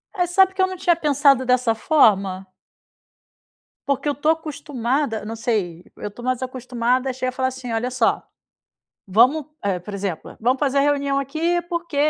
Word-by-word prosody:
Mas 355 Hz, -1 st, 0 dB
sabe 380 Hz, 0 st, +4 dB
que 380 Hz, -, -1 dB
eu 375 Hz, -, +4 dB
não 375 Hz, -, -6 dB
tinha 345 Hz, -1 st, +2 dB
pensado 280 Hz, -4 st, +3 dB
dessa 250 Hz, -2 st, +2 dB
forma? 200 Hz, -8 st, +2 dB, 1.4 s
Porque 280 Hz, +1 st, -1 dB
eu 290 Hz, -, +2 dB
estou 305 Hz, +3 st, +2 dB
acostumada, 280 Hz, -6 st, -2 dB
não 225 Hz, +1 st, -5 dB
sei, 210 Hz, -8 st, -2 dB
eu -, -, -5 dB
estou 240 Hz, +4 st, -12 dB
mais 255 Hz, 0 st, -1 dB
acostumada, 255 Hz, 0 st, -1 dB
a -, -, -2 dB
chegar 255 Hz, 0 st, -2 dB
e -, -, -19 dB
falar 260 Hz, -1 st, 0 dB
assim: 260 Hz, -2 st, -6 dB
"Olha 230 Hz, +3 st, -1 dB
só, 250 Hz, -2 st, +1 dB, 0.8 s
vamos", 255 Hz, +10 st, +3 dB, 0.4 s
por 205 Hz, -, -7 dB
exemplo, 195 Hz, -4 st, -5 dB
"Vamos 250 Hz, +4 st, +2 dB
fazer 280 Hz, -1 st, +1 dB
a -, -, +5 dB
reunião 280 Hz, -1 st, +1 dB
aqui, 320 Hz, +6 st, 0 dB
porque 340 Hz, -3 st, -5 dB
260 Hz, 175 wpm, -22 LUFS, 235-295 Hz, 1.4 s, a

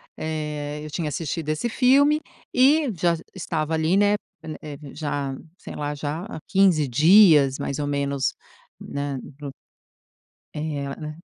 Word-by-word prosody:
eh, 150 Hz, -2 st, -4 dB
eu -, -, -7 dB
tinha 155 Hz, 0 st, -3 dB
assistido 155 Hz, 0 st, -4 dB
esse 155 Hz, +10 st, -1 dB
filme 280 Hz, +6 st, +4 dB, 0.3 s
e 280 Hz, +3 st, +4 dB
já 170 Hz, 0 st, +1 dB, 0.2 s
estava 160 Hz, -4 st, -2 dB
ali 160 Hz, +4 st, +2 dB
né, 205 Hz, +1 st, +4 dB, 0.3 s
en 155 Hz, -1 st, -6 dB
eh 145 Hz, -2 st, -8 dB
vi 145 Hz, -2 st, -12 dB
já 145 Hz, -3 st, -3 dB, 0.2 s
sei -, -, -9 dB
lá, 145 Hz, 0 st, -3 dB
já, 150 Hz, +3 st, -4 dB
há 220 Hz, -, -7 dB
15 185 Hz, -7 st, +3 dB
dias 150 Hz, -, +6 dB
mais 140 Hz, -, -3 dB
ou 145 Hz, -, -2 dB
menos, 140 Hz, -2 st, -1 dB, 0.5 s
nem, 140 Hz, -1 st, -4 dB, 0.2 s
pro 145 Hz, -2 st, -7 dB, 1.0 s
Eh, 150 Hz, -2 st, -3 dB
nem 150 Hz, -1 st, -7 dB
155 Hz, 150 wpm, -24 LUFS, 145-180 Hz, 1.0 s, dias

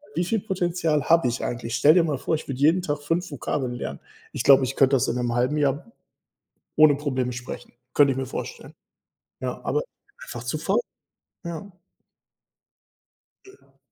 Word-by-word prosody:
„Wie 175 Hz, -, +1 dB
viel 220 Hz, +3 st, 0 dB
Potenzial 175 Hz, -6 st, 0 dB
habe 165 Hz, -3 st, +4 dB
ich 120 Hz, -, -2 dB
eigentlich?” 115 Hz, -1 st, -4 dB
Stell 150 Hz, +6 st, +6 dB
dir 175 Hz, -, +5 dB
mal 150 Hz, -5 st, -1 dB
vor, 160 Hz, -, 0 dB
ich 155 Hz, -, -7 dB
würde 135 Hz, -1 st, -5 dB
jeden 165 Hz, +5 st, +4 dB
Tag 145 Hz, -4 st, -2 dB
5 165 Hz, +3 st, -1 dB
Vokabeln 130 Hz, -1 st, -2 dB
lernen. 70 Hz, -, -5 dB, 0.3 s
Ich -, -, -3 dB
glaube, 135 Hz, -1 st, +7 dB
ich 130 Hz, +1 st, -2 dB
könnte 135 Hz, 0 st, +4 dB
das 125 Hz, -, +1 dB
in 115 Hz, -, -1 dB
'nem 120 Hz, -1 st, -1 dB
1/2 125 Hz, +5 st, +1 dB
Jahr 145 Hz, -, 0 dB, 0.8 s
ohne 155 Hz, -1 st, +7 dB
Probleme 130 Hz, -4 st, -2 dB
sprechen, 125 Hz, 0 st, -8 dB, 0.2 s
könnte 145 Hz, -2 st, +6 dB
ich 130 Hz, -, -3 dB
mir 130 Hz, -, -3 dB
vorstellen. 475 Hz, -, -7 dB, 0.7 s
Ja, -, -, -3 dB
aber 455 Hz, -, +1 dB, 0.4 s
einfach -, -, -7 dB
zu -, -, -2 dB
faul. -, -, +1 dB, 0.6 s
Ja. 170 Hz, +4 st, -6 dB, 1.7 s
Ja. 390 Hz, +1 st, -20 dB
145 Hz, 170 wpm, -24 LUFS, 130-170 Hz, 1.7 s, glaube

